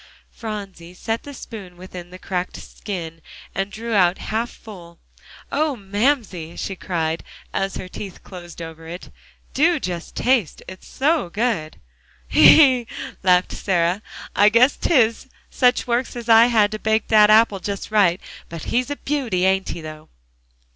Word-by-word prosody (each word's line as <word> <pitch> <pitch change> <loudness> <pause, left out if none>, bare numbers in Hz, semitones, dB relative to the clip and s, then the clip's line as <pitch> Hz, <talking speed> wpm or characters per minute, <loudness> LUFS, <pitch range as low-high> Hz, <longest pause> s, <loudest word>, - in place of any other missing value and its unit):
Phronsie 195 -6 -8
set 225 +5 -3
the 285 - -10
spoon 195 -8 -10
within 180 -1 -10
the 180 - -11
cracked 180 -1 -4
skin, 165 -5 -7 0.3
and 195 +1 -2
drew 230 +2 -6
it 215 - +2
out 180 -1 +4
half 225 +2 -3
full. 175 -6 -13 0.5
"Oh, 300 0 0
Mamsie!" 205 - -1
she 195 - -4
cried, 165 -3 -2 0.3
as 195 0 -2
her 185 - -6
teeth 190 0 -9
closed 175 -2 -10
over 165 0 -10
it, 175 +2 -9 0.4
"do 325 +3 +3
just 175 -7 -5
taste; 245 - +1
it's 185 0 -11
so 295 - 0
good!" 200 -5 -2 0.5
"Hee - - +6 0.3
hee!" 235 - -11 0.3
laughed 180 -1 +3
Sarah, 180 0 0 0.3
"I 205 +1 +6
guess 240 +5 +4
'tis. 240 -6 +2 0.2
Such 250 -1 +2
works 245 +1 -1
as 240 -1 -7
I 230 +1 +7
had 220 -3 +3
to 215 - -4
bake 220 +1 0
dat 210 -1 +6
apple 215 -2 +5
just 200 +2 -5
right. 195 -4 +3 0.3
But 165 -1 -7
he's 250 +3 -1
a 290 - -2
beauty, 250 -12 -1
ain't 190 0 +1
he, - - -5
though?" 155 0 -10
200 Hz, 160 wpm, -21 LUFS, 180-230 Hz, 0.5 s, I